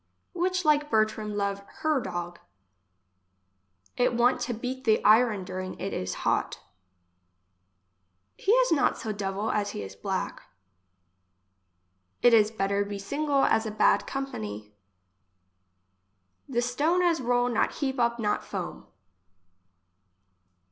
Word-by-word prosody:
Which 365 0 -1
like 295 -1 +3
Bertram, 215 -2 0
love 200 -1 -1 0.2
hir 310 -3 +2
dog. 175 -4 -5 1.6
It 245 0 +1
want 240 +2 +3
to 245 - -2
beat 255 +3 -5
the 220 -3 +3
iron 215 -2 +5
during 185 0 -6
it 195 - -4
is 90 0 -3
hot. - - 0 1.8
He 395 - 0
is - - +4
not 315 - +2
so 220 - -4
devil 200 +1 -2
as 205 -1 0
he - - -5
is 95 0 -9
black. - - -3 1.8
It 245 - +6
is 215 -2 +6
better 200 -2 0
be 200 0 -5
single 280 +7 0
as 220 0 +2
a - - -2
bad 215 - +2
company. 105 - -5 1.8
The 240 -2 0
stone 305 +9 +1
as 335 -4 +2
roll 245 0 +2
not 235 -3 +1
heap 270 -2 -2
up 235 0 +2
not 210 -3 -1
foam. - - -6
230 Hz, 125 wpm, -27 LUFS, 200-270 Hz, 1.8 s, It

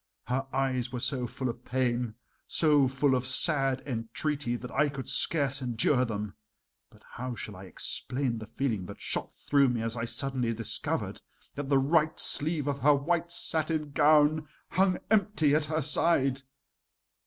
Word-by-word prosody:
Her 130 +2 -2
eyes 130 -2 -1
were 125 - -4
so 125 0 -1
full 130 +3 -4
of 120 0 -6
pain, 120 -3 -1 0.3
so 150 -4 +3
full 135 +1 +1
of 125 0 0
sad 135 -1 +3
entreaty 120 +2 -3
that 125 +1 -8
I 150 - +1
could 140 -2 -7
scarce 140 -4 +2
endure 125 +1 +1
them; 105 -3 -5 0.6
but - - -22
how 125 +1 -6
shall 105 -1 -7
I 95 +1 -10
explain 125 +5 -1
the 110 - -9
feeling 110 -6 -3
that 100 - -10
shot - - -2
through 140 -2 +2
me 120 -2 -2
as 115 0 0
I 115 0 -3
suddenly 125 -1 -1
discovered 115 -1 -2 0.3
that 140 -1 -6
the 140 - +4
right 155 +3 +2
sleeve 150 -1 +2
of 140 -1 -2
her 150 +1 +4
white 170 +4 -1
satin 155 -3 0
gown 150 +1 +3 0.2
hung 185 +1 +2
empty 200 -9 +2
at 150 0 +2
her 155 0 -2
side? 140 -3 +2
135 Hz, 165 wpm, -28 LUFS, 120-150 Hz, 0.6 s, the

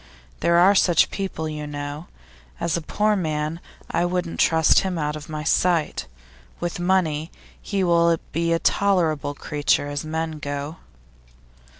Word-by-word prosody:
There 170 0 +3
are 185 +3 +6
such 180 -3 +4
people, 190 -5 -3
you 150 -1 -5
know. 145 +2 -6 0.5
As 170 -1 0
a 170 - -2
poor 210 +6 +1
man, 155 -3 -2 0.3
I 170 - +1
wouldn't 175 -1 -2
trust 160 -1 +5
him 190 -2 -2
out 150 -1 -1
of 155 +1 -9
my 155 -1 -4
sight; 165 - +1 0.5
with 175 0 -3
money, 175 -4 +1 0.3
he 200 -2 -1
will 170 -1 +4
be 170 0 0
a 165 - +3
tolerable 160 -7 +1
creature 145 0 0
as 145 0 -3
men 160 0 -3
go. 145 +2 -5
165 Hz, 150 wpm, -23 LUFS, 150-175 Hz, 0.5 s, are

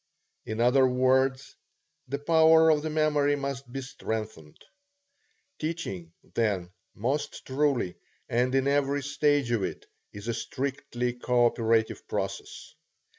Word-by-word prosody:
In 110 +1 -4
other 125 +3 +5
words, 130 +1 +1 0.5
the 140 +3 -2
power 160 +1 +5
of 150 -1 +2
the 155 - -3
memory 150 -2 +2
must 140 -2 -5
be 135 +1 -4
strengthened. 110 - -6 1.0
Teaching, 155 - -4 0.2
then, 100 -6 0 0.2
most 130 +8 -2
truly, 135 -8 0 0.3
and 125 +2 +1
in 135 0 +2
every 140 0 +1
stage 145 -2 +1
of 115 -3 +1
it, - - -4 0.3
is 100 +2 -9
a 115 - 0
strictly 125 0 -3
co 125 0 +2
operative 115 -1 +1
process. - - -5
130 Hz, 125 wpm, -28 LUFS, 115-145 Hz, 1.0 s, other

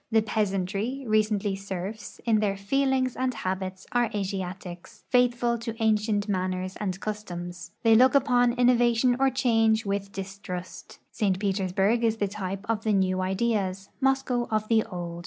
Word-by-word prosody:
The 220 -1 +3
peasantry, 210 +4 -1
recently 215 -2 +1
serfs, 195 +2 -6
in 225 -2 +3
their 200 -2 0
feelings 260 +4 +1
and 255 0 0
habits 185 -3 -4
are 240 -2 +2
Asiatics, 185 -3 -5
fliithful 240 -1 +3
to 230 0 -5
ancient 215 -1 +1
manners 185 -1 -2
and 190 -3 -3
customs. 175 -5 -6
They 225 -1 +6
look 255 +4 +6
upon 245 -3 +4
innovation 245 0 +3
or 270 0 +4
change 225 -4 +2
with 200 0 -2
distrust. 190 -2 -7
St. 195 -4 0
Petersburg 195 +3 +1
is 225 -1 +2
the 205 - 0
type 195 -1 -5
of 220 -1 -1
the 215 - +1
new 185 -1 +1
ideas, 195 -1 -1
IMoscow 265 -2 +1
of 215 -1 0
the 225 -1 +4
old. 175 -2 -6
210 Hz, 150 wpm, -27 LUFS, 190-235 Hz, -, They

